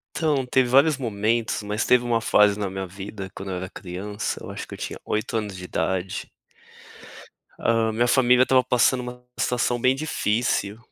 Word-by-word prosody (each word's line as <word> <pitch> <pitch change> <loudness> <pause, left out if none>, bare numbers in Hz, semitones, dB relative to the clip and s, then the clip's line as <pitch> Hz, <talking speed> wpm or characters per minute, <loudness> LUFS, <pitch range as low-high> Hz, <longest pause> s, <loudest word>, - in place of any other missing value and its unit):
Então, 145 -5 +1
teve 125 0 +2
vários 140 +3 +5
momentos, 110 -1 -1
mas 105 +2 -2
teve 125 -1 +4
uma 120 -1 +1
fase 105 -2 +4
na 100 -2 -1
minha 95 0 -5
vida 95 +1 -8
quando 95 0 -6
eu 90 - -2
era 90 0 -5
criança, 100 +3 -5
eu - - -8
acho - - -7
que - - -10
eu - - -7
tinha - - -6
8 110 +1 -1
anos 105 -3 -4
de 90 - -8
idade. 90 +2 -2 1.3
Hã, 115 -1 +1
minha 120 +2 +1
família 125 0 +5
estava 130 0 +4
passando 125 +1 +2
uma 125 0 -9
situação 120 0 0
bem 130 +2 +3
difícil, 110 -7 -1
115 Hz, 180 wpm, -24 LUFS, 100-125 Hz, 1.3 s, vários